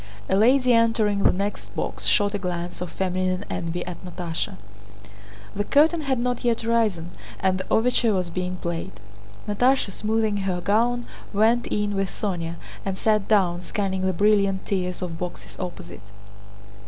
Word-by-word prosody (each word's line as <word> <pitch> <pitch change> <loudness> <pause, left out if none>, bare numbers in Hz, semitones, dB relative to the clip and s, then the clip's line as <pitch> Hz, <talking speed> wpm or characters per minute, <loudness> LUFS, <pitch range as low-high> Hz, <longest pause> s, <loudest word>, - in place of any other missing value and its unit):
A - - +2
lady 250 +4 +5
entering 225 -3 +3
the - - +5
next 200 +2 -4
box - - -3
shot 205 -1 +3
a 205 - -1
glance 175 -2 -4
of 180 - -3
feminine 185 +1 -1
envy 170 +1 -3
at 180 - -7
Natásha. 175 -2 -4 1.0
The 205 - 0
curtain 310 +8 +4
had 275 -3 0
not 245 0 -1
yet 235 -2 +1
risen 215 -7 +1 0.3
and 190 -1 +1
the 190 - -5
overture 235 0 +3
was 180 -2 -1
being 180 +1 -2
played. 170 +1 -4 0.5
Natásha, 245 +1 +2
smoothing 215 0 0
her 190 -2 -1
gown, 235 +6 +1 0.3
went 225 +4 +3
in 210 0 -1
with 195 -1 0
Sónya 170 -5 -3 0.3
and 195 -1 -3
sat 215 -1 +2
down, 180 -5 +3
scanning 190 0 -2
the 190 0 +2
brilliant 200 0 +2
tiers 180 -2 -2
of 165 -2 -5
boxes 180 -1 -6
opposite. 90 - -6
195 Hz, 155 wpm, -24 LUFS, 180-220 Hz, 1.0 s, lady